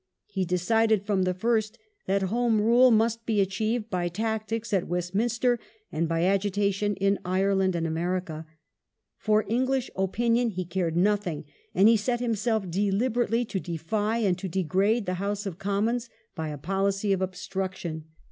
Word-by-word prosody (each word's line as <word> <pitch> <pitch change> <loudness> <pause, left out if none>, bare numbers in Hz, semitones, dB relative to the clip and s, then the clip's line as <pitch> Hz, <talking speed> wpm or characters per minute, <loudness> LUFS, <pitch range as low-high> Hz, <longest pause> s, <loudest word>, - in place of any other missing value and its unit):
He 190 -3 -2
decided 210 +4 +2
from 200 -2 +1
the 185 - +1
first 220 +1 0 0.3
that 195 0 +1
Home 225 +3 +1
Rule 240 +4 +5
must 230 0 +2
be 220 -2 0
achieved 215 +4 -1
by 180 -2 0
tactics 220 +4 -3
at 190 -3 +1
Westminster 220 +8 0 0.3
and 165 +1 -1
by 165 0 +1
agitation 200 +1 +1
in 195 +1 +1
Ireland 190 0 +1
and 165 -1 -1
America. 165 -1 -2 0.7
For 215 -1 +2
English 255 +3 0
opinion 230 +5 +1
he 185 -3 -4
cared 170 -2 -1
nothing, 190 -5 +1 0.3
and 195 +3 +6
he 225 0 +6
set 240 +3 -1
himself 225 -3 0
deliberately 220 +5 +1
to 195 - -3
defy 205 +7 -2
and 200 -6 +2
to 190 0 -4
degrade 190 +6 +1
the 185 - -1
House 205 +1 -2
of 190 -3 -5
Commons 225 +5 -1 0.2
by 160 -1 -4
a 150 - -5
policy 195 +5 0
of 190 - -1
obstruction. 185 -3 -4
200 Hz, 155 wpm, -27 LUFS, 185-225 Hz, 0.7 s, and